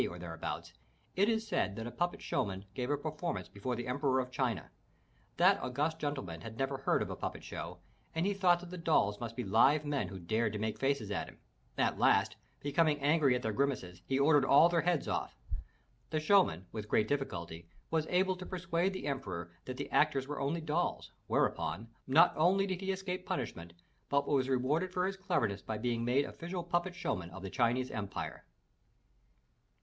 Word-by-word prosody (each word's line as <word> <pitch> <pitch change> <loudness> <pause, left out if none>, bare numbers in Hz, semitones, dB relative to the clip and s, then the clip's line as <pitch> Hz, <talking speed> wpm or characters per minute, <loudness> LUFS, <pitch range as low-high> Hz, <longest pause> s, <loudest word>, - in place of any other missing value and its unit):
or 85 - -8
thereabouts, 85 -2 -5 0.4
it 200 +4 +4
is 220 -1 0
said 105 - 0
that 115 - -5
a 120 - -5
puppet 175 +5 -2
show - - +1
man 95 0 -5
gave 125 +3 -3
a 145 - +2
performance 155 +3 -3
before 120 +5 -3
the 120 +1 -4
Emperor 130 +1 +1
of 125 0 -3
China. 125 - -1 0.7
That - - +5
august 150 +6 -1
gentleman 135 - -3
had 115 0 -8
never 135 +1 -1
heard 135 - +2
of - - -6
a - - -3
puppet - - -5
show - - -6 0.4
and 165 +2 +1
he 205 - +2
thought 180 -3 +3
that 180 0 -10
the 180 - -6
dolls 105 -11 +2
must 115 -1 -5
be 125 - -2
live 135 +9 +4
men 140 -9 0
who 95 +2 -7
dared 110 +5 0
to - - -2
make 110 0 -2
faces 135 -6 0
at 100 - -2
him. - - -16 0.4
At - - +1
last, - - +4 0.3
becoming 150 +1 +2
angry 145 -2 +4
at 125 - -2
their 110 - 0
grimaces, 105 -9 -1
he 135 - +1
ordered 145 0 +5
all 140 +5 +7
their 170 -1 +2
heads 175 -4 +1
off! - - -2 0.7
The 155 - 0
show 195 +5 +6
man 90 - -5
with 105 -1 -6
great 105 - +3
difficulty 85 - -3 0.2
was 160 -1 +1
able 185 +1 +2
to 180 - -7
persuade 180 0 0
the 185 - -5
emperor 95 - -3
that 130 0 -5
the 140 - -5
actors 140 -3 +3
were 145 0 -4
only 155 +5 0
dolls, 160 +3 -1 0.2
whereupon, 95 +9 0 0.2
not 135 - +6
only 185 +5 +4
did 190 -1 -3
he 195 0 0
escape 185 -1 -3
punishment, 85 -10 -4 0.4
but 140 0 +2
was 135 -2 +2
rewarded 145 +8 +1
for 180 0 0
his 195 +1 -1
cleverness 170 - 0
by 110 - -4
being 115 +1 -1
made 130 +4 +2
official 175 +1 -5
puppet 175 +1 -1
show - - -1
man 90 -3 -7
of 95 +3 -10
the 95 - -5
Chinese 125 +1 +1
Empire. 100 -2 -5
140 Hz, 200 wpm, -33 LUFS, 110-170 Hz, 0.7 s, all